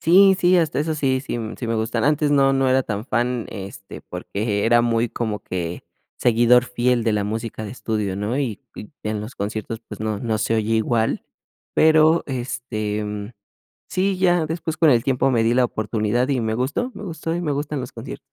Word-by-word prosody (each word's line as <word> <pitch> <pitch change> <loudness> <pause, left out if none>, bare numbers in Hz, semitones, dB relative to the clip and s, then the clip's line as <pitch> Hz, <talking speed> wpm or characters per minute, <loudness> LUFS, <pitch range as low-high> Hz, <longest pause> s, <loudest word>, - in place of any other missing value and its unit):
Sí, 190 +3 +6
sí. 180 0 +4
Hasta 160 -4 +1
eso 155 +2 0
sí 135 -3 +1
sí 130 -3 -4 0.2
sí 120 - -4
me 115 - 0
gustan. 110 +1 -1
Antes 150 0 +2
no 135 -1 +4
no 135 -1 +2
era 130 +1 +3
tan 105 -2 -4
fan, 120 -1 -1
este, 95 0 -8
porque 105 0 -3
era 120 +1 +5
muy 120 0 +1
como 110 -3 -3
que 85 -2 -4 0.3
seguidor 120 +1 +4
fiel 125 -1 +1
de 110 - +2
la 105 -1 0
música 110 +1 -4
de 105 - -6
estudio, 105 -4 -2
¿no? 105 +6 -2
Y 120 -8 -2
y 105 - -9
en 105 -1 -2
los 110 +5 -8
conciertos, 110 +2 -4
pues, 105 - -8
no 110 -1 -2
no 110 -2 -1
se 110 +1 0
oye 110 0 +1
igual. 110 0 +1 0.5
Pero, 160 +1 +5
este, 110 -5 -4 0.6
sí, 190 0 0
ya 175 -3 +3
después 160 0 -3
con 160 -2 +5
el 115 -1 +3
tiempo 135 0 +2
me 115 -2 +2
di 115 +1 +3
la 130 - +4
oportunidad 110 +2 -1
y 135 - +1
me 110 -1 -1
gustó, 145 - -1
me - - -9
gustó, 165 -2 -4
y 175 - -2
me 155 - -1
gustan 145 0 -2
los 125 - -6
conciertos. 115 +3 -8
120 Hz, 205 wpm, -22 LUFS, 110-140 Hz, 0.6 s, Sí